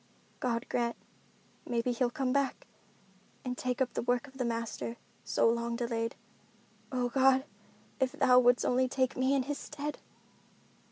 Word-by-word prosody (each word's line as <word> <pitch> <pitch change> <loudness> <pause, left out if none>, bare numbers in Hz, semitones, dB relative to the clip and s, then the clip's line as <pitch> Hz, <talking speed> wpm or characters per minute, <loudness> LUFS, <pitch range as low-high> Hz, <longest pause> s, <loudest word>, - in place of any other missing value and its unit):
"God 235 -2 -1
grant—maybe 235 0 -4
he'll 245 +1 +1
come 255 0 -1
back—and 265 -2 -5
take 250 +1 0
up 250 - -6
the - - -1
work 245 +2 +1
of 270 -1 -15
the - - +1
Master, 230 0 -3 0.3
so - - +2
long 235 0 +1
delayed. 230 -1 -2 0.8
Oh 250 -2 0
God! 265 +1 +4 0.5
If 260 -1 +1
Thou 250 0 +6
wouldst 245 0 +4
only 255 +1 +3
take 260 0 0
me 260 +1 +2
in 270 - +2
his 285 +2 -3
stead!" 295 0 -5
250 Hz, 145 wpm, -31 LUFS, 235-265 Hz, 0.8 s, Thou